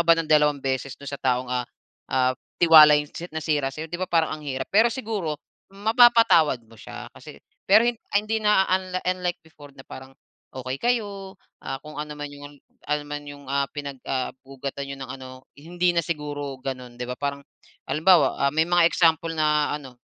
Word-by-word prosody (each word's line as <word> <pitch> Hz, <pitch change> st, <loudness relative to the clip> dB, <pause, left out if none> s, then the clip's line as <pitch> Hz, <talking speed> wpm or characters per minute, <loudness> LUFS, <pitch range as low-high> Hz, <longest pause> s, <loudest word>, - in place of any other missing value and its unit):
ka -, -, +4 dB
ba 170 Hz, -, +7 dB
ng 165 Hz, -, -2 dB
dalawang 150 Hz, -1 st, +4 dB
beses 135 Hz, 0 st, -2 dB
do'n 140 Hz, -, -12 dB
sa 140 Hz, -, -7 dB
taong, 125 Hz, -1 st, +1 dB
ah, 125 Hz, 0 st, 0 dB, 0.5 s
ah, 130 Hz, -1 st, +3 dB, 0.3 s
tiwala 155 Hz, -3 st, +9 dB
'yong 150 Hz, -1 st, -5 dB
si 175 Hz, -, -6 dB
nasira 150 Hz, -3 st, -1 dB
sa'yo 155 Hz, +4 st, -7 dB
'di 175 Hz, -, -8 dB
ba, 185 Hz, -, -1 dB
parang 165 Hz, -2 st, +2 dB
ang -, -, -13 dB
hirap. 130 Hz, -1 st, -4 dB
Pero 220 Hz, +3 st, +6 dB
siguro 210 Hz, -, -3 dB, 0.4 s
mapapatawad 220 Hz, -, +4 dB
mo 115 Hz, -, -18 dB
siya -, -, -9 dB
kasi -, -, -12 dB, 0.3 s
pero 215 Hz, +4 st, +6 dB
hin 240 Hz, -, 0 dB, 0.2 s
ah, 205 Hz, -, +4 dB
hindi 215 Hz, +1 st, -2 dB
na 210 Hz, -2 st, +4 dB
unli 185 Hz, 0 st, 0 dB
unlike 180 Hz, -1 st, -1 dB
before 145 Hz, -2 st, -15 dB
na 135 Hz, -, -13 dB
parang, 130 Hz, 0 st, -11 dB, 0.5 s
okey 130 Hz, +1 st, -4 dB
kayo, 200 Hz, -5 st, -2 dB, 0.3 s
ah, 135 Hz, -, -4 dB
kung 150 Hz, 0 st, -10 dB
ano 150 Hz, 0 st, -6 dB
man 145 Hz, -, -4 dB
'yung 145 Hz, 0 st, -12 dB, 0.3 s
ano 150 Hz, 0 st, +1 dB
naman 145 Hz, 0 st, -5 dB
'yong, 145 Hz, 0 st, -11 dB
ah, 140 Hz, 0 st, 0 dB
pinag, 140 Hz, -2 st, -7 dB
ah, 130 Hz, -1 st, -1 dB
ugatan 135 Hz, +1 st, -6 dB
niyo 140 Hz, -, -6 dB
ng 130 Hz, -, -7 dB
ano 130 Hz, -1 st, -10 dB, 0.3 s
hindi 175 Hz, +4 st, -1 dB
na 170 Hz, -, +3 dB
siguro 145 Hz, -4 st, -4 dB
ganun. 125 Hz, -2 st, -6 dB
'Di 125 Hz, -, -3 dB
ba 125 Hz, -, -3 dB
parang 140 Hz, 0 st, -2 dB, 0.5 s
halimbawa, 170 Hz, +3 st, +4 dB
ah, -, -, -4 dB
may 160 Hz, -, +3 dB
mga 175 Hz, 0 st, +4 dB
example 165 Hz, -1 st, +2 dB
na 150 Hz, -1 st, +1 dB
ano, 130 Hz, -4 st, -12 dB
150 Hz, 200 wpm, -24 LUFS, 140-175 Hz, 0.5 s, tiwala